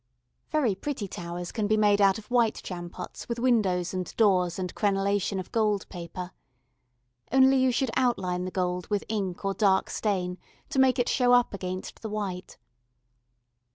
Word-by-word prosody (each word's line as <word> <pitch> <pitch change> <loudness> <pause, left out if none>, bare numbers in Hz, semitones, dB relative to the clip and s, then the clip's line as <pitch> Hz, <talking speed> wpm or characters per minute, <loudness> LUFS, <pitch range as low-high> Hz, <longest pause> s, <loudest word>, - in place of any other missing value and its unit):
Very 275 -9 +2
pretty 210 +1 -4
towers 175 0 -6
can 215 -3 -1
be 215 +1 +2
made 205 -1 +4
of 195 -1 +5
white 235 -3 +2
jam 175 -2 -6
pots 180 +5 -9
with 235 - -2
windows 205 -8 +1
and 185 -1 -3
doors 185 -5 +3
and 180 -2 -4
crenellation 200 -1 0
of 185 - -7
gold 210 -3 +1
paper. 180 0 -7 1.0
Only 265 +1 +5
you 260 0 +3
should 250 0 0
outline 185 -8 0
the - - -3
gold 180 -1 -2
with 205 -1 -1
ink 195 -4 -3
or 195 - +1
dark 195 -2 +2
stain 185 -4 -1 0.3
to 270 - -1
make 265 0 +4
it 245 - +1
show 245 -2 +3
up 245 -3 +4
against 185 -1 -5
the 220 - -5
white. 195 -4 -5
200 Hz, 165 wpm, -27 LUFS, 180-230 Hz, 1.0 s, of